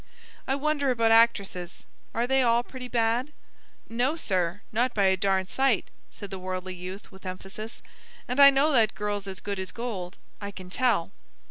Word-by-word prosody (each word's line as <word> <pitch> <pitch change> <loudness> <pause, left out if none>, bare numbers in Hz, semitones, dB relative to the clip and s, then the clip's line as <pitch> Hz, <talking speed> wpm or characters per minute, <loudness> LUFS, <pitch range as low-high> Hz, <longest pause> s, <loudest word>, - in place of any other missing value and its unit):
"I 270 - +1
wonder 285 -1 0
about 230 -3 +3
actresses; 200 -6 +2 0.3
are 235 +1 +1
they 265 +1 +3
all 235 -1 +3
pretty 255 0 -8
bad?" 240 +3 +1 0.6
"No, 245 +6 0
sir, 185 - -1
not 245 +3 +1
by 205 - +3
a 190 -1 +5
darn 190 0 +1
sight," 265 +2 +1 0.2
said 200 -2 -10
the 190 - -5
worldly 185 0 -4
youth 185 +3 -8
with 190 0 -15
emphasis, 195 +4 -7 0.4
"and 250 +3 -2
I 280 0 +11
know 280 +3 +3
that 225 -7 +3
girl's 205 0 -3
as 190 -1 -5
good 200 -1 -4
as 190 -1 -3
gold. 205 -7 -5 0.2
I 200 - -4
can 185 -2 -10
tell." 220 -7 +1
215 Hz, 175 wpm, -27 LUFS, 190-250 Hz, 0.6 s, I